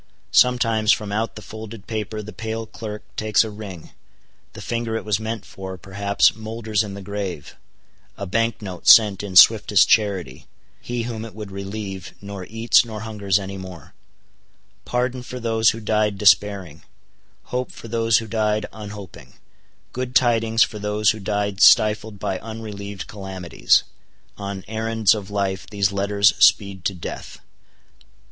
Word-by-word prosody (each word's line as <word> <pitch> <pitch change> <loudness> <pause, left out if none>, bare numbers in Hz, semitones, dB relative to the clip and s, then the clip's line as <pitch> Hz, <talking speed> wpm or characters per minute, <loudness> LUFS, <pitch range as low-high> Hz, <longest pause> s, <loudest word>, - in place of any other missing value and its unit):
Sometimes 115 -3 +3
from 105 -3 0
out 110 +2 -2
the 105 - -9
folded 110 -1 -9
paper 110 -1 -4
the 110 0 -9
pale 110 +3 -4
clerk 105 +1 -8
takes 110 0 +2
a 110 - -6
ring:—the 100 -6 -13
finger 115 -1 -3
it 110 - -4
was 105 -2 +1
meant 110 -1 -5
for, 95 -1 -8
perhaps, 100 +3 +1
moulders 110 -1 -2
in 100 -2 -5
the 100 - -8
grave; 100 -6 -5 0.6
a 100 - -4
bank 115 +3 -1
note 90 -4 -8
sent 105 -4 +7
in 100 -3 -7
swiftest 105 0 +7
charity:—he 105 +3 -2
whom 115 -2 -5
it 115 -2 -10
would 105 -2 -8
relieve, 100 -1 -6
nor 100 -2 -8
eats 115 +3 +3
nor 110 -3 -7
hungers 105 -4 0
any 100 -1 -5
more; 90 -4 -10 0.9
pardon 125 +1 -1
for 125 +1 -8
those 115 -2 +2
who 115 - -2
died 105 -2 0
despairing; 100 -6 +2 0.7
hope 125 0 -2
for - - -11
those 115 -1 +2
who 115 - -2
died 110 -1 0
unhoping; 105 -3 -10 0.6
good 125 0 -4
tidings 115 -2 +4
for 105 - -4
those 105 0 +2
who 110 - -7
died 100 0 -2
stifled 110 0 +5
by 95 -1 -3
unrelieved 105 -4 -7
calamities. 95 -4 0 0.5
On 100 -2 -6
errands 110 -1 +2
of 105 -3 -6
life, 100 -2 -2
these 100 -2 0
letters 100 +1 +3
speed 100 -2 +4
to 100 - 0
death. 85 - -7
105 Hz, 150 wpm, -22 LUFS, 100-110 Hz, 0.9 s, sent